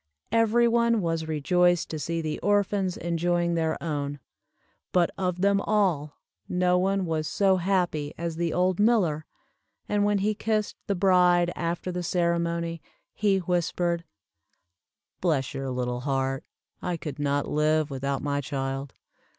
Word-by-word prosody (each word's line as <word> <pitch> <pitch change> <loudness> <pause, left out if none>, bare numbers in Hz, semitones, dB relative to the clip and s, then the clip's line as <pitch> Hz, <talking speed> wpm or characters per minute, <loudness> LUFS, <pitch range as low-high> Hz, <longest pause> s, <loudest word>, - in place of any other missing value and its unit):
Every 230 +1 +4
one 235 -1 +3
was 165 -3 -1
rejoiced 175 +3 +2
to 155 - -4
see 165 +2 -2
the 155 -1 -3
orphans 200 -2 +1
enjoying 170 +1 0
their 160 -1 0
own 145 -3 -2 0.7
but 175 -2 +3
of 180 -2 -2
them 200 0 +3
all 180 -10 0 0.3
no 180 0 +2
one 195 +1 +1
was 160 -2 -1
so 195 -2 +3
happy 175 -5 0
as 170 -1 -3
the 170 0 -1
old 180 +1 +1
miller, 190 -9 +2 0.6
and 205 -1 +1
when 205 0 +2
he 205 +2 +1
kissed 215 0 -1
the 200 - +1
bride 180 -2 +4
after 170 +2 -2
the 180 0 -3
ceremony, 170 -1 -1 0.3
he 205 -2 +2
whispered, 175 -1 0 1.2
"bless 150 -7 0
your 135 0 -4
little 125 -1 -2
heart, 135 0 -1 0.4
I 180 -1 -2
could 150 -2 -7
not 145 0 0
live 155 0 +1
without 135 0 -2
my 145 -1 0
child." 135 0 -4
170 Hz, 140 wpm, -26 LUFS, 150-190 Hz, 1.2 s, Every